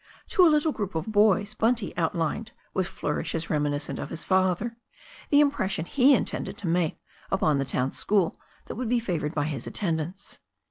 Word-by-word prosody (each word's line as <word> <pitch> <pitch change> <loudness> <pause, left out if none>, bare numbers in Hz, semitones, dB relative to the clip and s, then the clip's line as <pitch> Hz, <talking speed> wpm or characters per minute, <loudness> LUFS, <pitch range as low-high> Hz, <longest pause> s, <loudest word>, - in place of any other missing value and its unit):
To 380 - +5
a 345 - +8
little 300 0 +3
group 205 - -4
of 160 +7 -2
boys 205 0 +3
Bunty 225 -1 0
outlined 170 +5 -1 0.2
with 185 -2 0
flourishes 160 +2 -3
reminiscent 145 -2 -1
of - - -5
his 165 - -5
father 190 +4 +1 0.5
the 285 - +5
impression 205 - +1
he 275 +6 +5
intended - - -3
to 195 - -5
make 165 -1 +1 0.3
upon 155 -7 +2
the 135 - 0
town 130 0 0
school 195 -5 0 0.3
that - - -6
would 240 0 -3
be 245 0 +3
favoured 170 -8 -2
by 145 - +1
his 145 -5 -4
attend 165 -6 -1
ance. 180 +6 -8
185 Hz, 180 wpm, -26 LUFS, 160-225 Hz, 0.5 s, a